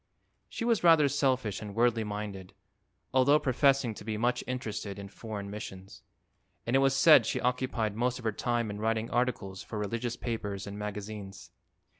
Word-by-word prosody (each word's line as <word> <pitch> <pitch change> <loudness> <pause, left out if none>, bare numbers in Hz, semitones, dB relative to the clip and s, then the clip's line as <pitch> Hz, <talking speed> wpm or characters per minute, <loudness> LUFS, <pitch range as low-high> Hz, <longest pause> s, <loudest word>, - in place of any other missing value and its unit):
She 230 - -4
was 230 -5 +2
rather 165 -4 +6
selfish 130 -7 0
and 105 -2 -7
worldly 115 -1 +2
minded, 105 -3 -6 0.6
although 130 +3 +5
professing 135 -3 +2
to 105 - -10
be 110 0 -3
much 120 +2 0
interested 110 -5 -4
in 100 0 -8
foreign 105 -1 -7
missions, 95 -3 -8 0.6
and 120 - 0
it - - +6
was 135 0 +3
said 135 -4 +7
she - - -1
occupied 125 -4 -1
most 125 +2 0
of 125 - -10
her 110 - +2
time 120 0 -1
in 105 - -6
writing 110 +1 -1
articles 110 -6 -1
for 110 - -7
religious 115 +3 -2
papers 105 -4 -4
and 100 0 -7
magazines. 105 -1 -7
115 Hz, 170 wpm, -30 LUFS, 105-125 Hz, 0.6 s, said